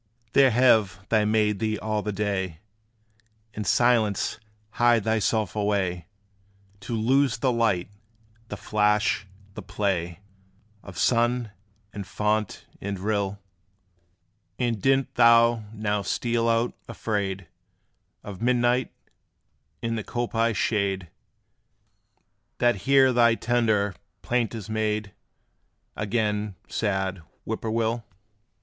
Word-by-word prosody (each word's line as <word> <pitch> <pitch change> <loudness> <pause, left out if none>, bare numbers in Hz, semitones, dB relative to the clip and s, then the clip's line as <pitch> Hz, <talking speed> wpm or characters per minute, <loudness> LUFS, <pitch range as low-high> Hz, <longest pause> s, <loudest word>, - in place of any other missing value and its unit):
There 135 -1 +6
have 110 -6 +3
they 110 -2 +3
made 105 -1 +1
thee 110 0 -1
all 110 -1 -2
the 105 - -3
day 95 -4 -2 1.0
In 105 - -4
silence 110 0 +2 0.3
hide 120 -2 +3
thyself 110 -1 0
away, 95 -5 -1 0.7
To 115 +4 -5
lose 130 +3 +2
the 130 +3 +1
light, 110 -7 +1 0.6
the - - -6
flash, 105 -2 +1 0.3
the - - -7
play 90 -3 -2 0.6
Of 95 -3 -11
sun, 120 +3 +1 0.4
and 100 -2 -6
fount, 105 +2 -1 0.2
and 100 0 -3
rill? 100 0 -2 1.1
And 120 -4 -1
didst 135 0 +2
thou 115 -1 +5
now 105 -2 -1
steal 115 +2 0
out, 115 +1 +1 0.2
afraid 100 -5 -3 0.8
Of 100 0 -9
midnight 125 +1 +2 0.9
in 115 0 -1
the 110 - -3
coppice 115 -2 -1
shade, 95 -5 -1 1.5
That 120 -2 +3
here 135 -2 +6
thy 115 -1 +4
tender 110 -4 +1 0.3
plaint 120 -2 0
is 105 -3 -7
made 110 -2 -2 0.8
Again, 105 -2 -1
sad 95 -3 -2 0.2
Whip - - -3
poor 110 - -3
will? 115 +1 -1
110 Hz, 110 wpm, -25 LUFS, 100-115 Hz, 1.5 s, There